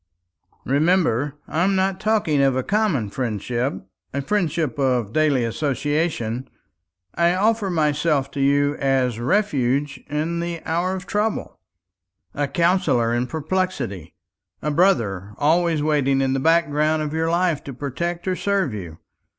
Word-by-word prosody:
"Remember, 145 -2 +2
I 165 - 0
am 195 +1 +2
not 190 0 0
talking 210 -9 +1
of 135 -2 +3
a 130 - 0
common 190 - 0
friendship, 120 -2 -2 0.3
a 140 0 -3
friendship 160 - -1
of 125 -6 +1
daily 150 -5 +2
association. 140 -1 -1 0.6
I 170 +1 +2
offer 210 +1 +1
myself 150 -3 +1
to 140 - -6
you 140 +1 +3
as 130 -4 +1
refuge 140 - 0
in 155 +3 -1
the 170 -1 -4
hour 175 +3 0
of 185 0 -7
trouble, 210 +1 -2 0.7
a 145 0 -1
counsellor 150 -7 +2
in 120 +1 0
perplexity, 145 - -3 0.5
a 150 - 0
brother 105 - +1
always 160 +1 +2
waiting 140 -3 +2
in 135 -1 +1
the 135 - 0
background 155 0 +2
of 150 0 -4
your 160 0 0
life 170 -3 +1
to 140 - -6
protect 170 +7 -4
or 185 - +1
serve 195 - 0
you. 85 -6 -7
150 Hz, 140 wpm, -22 LUFS, 130-175 Hz, 0.7 s, of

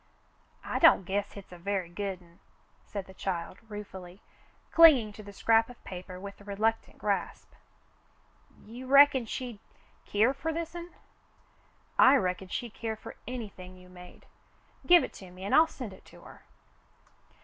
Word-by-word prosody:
"I - - -2
don't 325 - +7
guess 200 +2 -2
hit's 200 -2 -12
a 180 - -11
very 195 0 -2
good'n," 180 -2 -7 0.5
said 200 -2 -5
the 190 - -14
child, 185 -1 -4
ruefully, 190 -3 -9 0.5
clinging 275 -11 +7
to 215 - -10
the 205 -1 -11
scrap 225 +3 +2
of 245 - -14
paper 180 0 -8
with 200 +1 -9
reluctant 210 +3 -2
grasp. 205 -2 -3 1.1
"You 245 +4 -9
reckon 275 -3 +6
she'd 240 -2 -5 0.5
keer 220 +6 +2
fer 320 +4 -3
this'n.^" 340 +1 -6 1.0
"I 260 +2 +8
reckon 185 -5 -1
she'd 230 +4 -5
care 225 -1 -4
for - - -11
anything 200 -7 -7
you 180 0 -16
made. 180 0 -14 0.6
Give 350 -1 +7
it - - -6
to 190 - -11
me, 185 +1 -12
and 200 - -2
I'll 320 +1 +7
send 250 -10 -8
it 190 - -16
to - - -16
her." - - -15
205 Hz, 150 wpm, -29 LUFS, 185-250 Hz, 1.1 s, I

